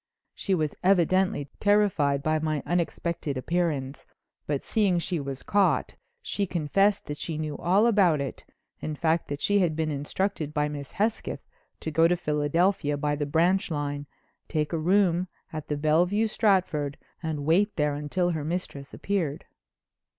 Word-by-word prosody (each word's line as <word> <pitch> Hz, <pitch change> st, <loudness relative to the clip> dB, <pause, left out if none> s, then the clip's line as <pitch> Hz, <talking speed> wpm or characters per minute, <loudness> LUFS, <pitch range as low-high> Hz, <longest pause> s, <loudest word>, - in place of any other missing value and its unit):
She 195 Hz, -, -1 dB
was 155 Hz, -4 st, -1 dB
evidently 185 Hz, -4 st, +3 dB
terrified 185 Hz, -10 st, +2 dB
by 155 Hz, 0 st, +1 dB
my 155 Hz, -2 st, -1 dB
unexpected 170 Hz, -3 st, -1 dB
appearance, 145 Hz, -2 st, -2 dB, 0.4 s
but 145 Hz, -2 st, -1 dB
seeing 200 Hz, -5 st, +2 dB
she 175 Hz, 0 st, -1 dB
was 135 Hz, -2 st, -5 dB
caught, 205 Hz, -1 st, +2 dB, 0.3 s
she 200 Hz, -1 st, -2 dB
confessed 190 Hz, +5 st, +1 dB
that 145 Hz, -1 st, -6 dB
she 160 Hz, -2 st, -4 dB
knew 155 Hz, -1 st, -3 dB
all 190 Hz, +5 st, +3 dB
about 195 Hz, -9 st, +4 dB
it, 140 Hz, -1 st, -5 dB, 0.4 s
in 155 Hz, -, -4 dB
fact, 160 Hz, +2 st, +1 dB
that 145 Hz, 0 st, -5 dB
she 205 Hz, 0 st, +3 dB
had 170 Hz, -5 st, +1 dB
been 160 Hz, -1 st, -1 dB
instructed 150 Hz, +2 st, -2 dB
by 150 Hz, 0 st, +1 dB
Miss 145 Hz, -2 st, -7 dB
Hesketh 215 Hz, +3 st, -2 dB, 0.3 s
to 160 Hz, -, -3 dB
go 165 Hz, +2 st, +5 dB
to 175 Hz, +1 st, +1 dB
Philadelphia 150 Hz, 0 st, +1 dB
by 145 Hz, +1 st, 0 dB
the 145 Hz, 0 st, -2 dB
branch 175 Hz, +7 st, +2 dB
line, 145 Hz, -2 st, -3 dB, 0.4 s
take 155 Hz, 0 st, -1 dB
a -, -, +1 dB
room 180 Hz, +1 st, +2 dB, 0.3 s
in 155 Hz, -1 st, -4 dB
the 150 Hz, -, -2 dB
Bellevue 175 Hz, +8 st, +2 dB
Stratford, 185 Hz, -10 st, +1 dB, 0.2 s
and 155 Hz, -4 st, -3 dB
wait 195 Hz, +7 st, +3 dB
there 150 Hz, -1 st, 0 dB
till 180 Hz, +2 st, +1 dB
her 155 Hz, -3 st, -3 dB
mistress 150 Hz, -4 st, -4 dB
appeared. 170 Hz, -8 st, -2 dB
160 Hz, 160 wpm, -27 LUFS, 145-185 Hz, 0.4 s, go